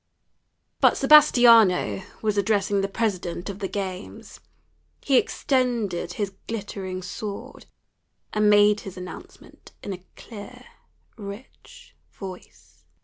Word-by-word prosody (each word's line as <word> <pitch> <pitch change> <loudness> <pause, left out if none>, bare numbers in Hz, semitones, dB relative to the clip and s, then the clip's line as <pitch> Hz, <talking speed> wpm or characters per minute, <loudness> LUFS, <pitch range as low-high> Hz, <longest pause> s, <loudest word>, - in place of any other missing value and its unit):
But - - +4
Sebastiano 235 -11 +6 0.2
was 215 -1 +1
addressing 200 -1 +1
the 195 - -1
president 195 -3 -3
of 195 - -11
the 195 - -2
games. 190 -1 -6 0.6
He 275 - +2
extended 235 -12 0
his 200 -2 -3
glittering 195 -4 -5
sword, 200 +2 -7 0.7
and 210 0 +3
made 210 0 +5
his 190 -1 -10
announcement 180 0 -12
in 200 - -4
a 180 -1 -10
clear, 210 -3 -11 0.5
rich 205 +4 -12 0.2
voice. 190 -2 -12
205 Hz, 105 wpm, -24 LUFS, 190-220 Hz, 0.7 s, Sebastiano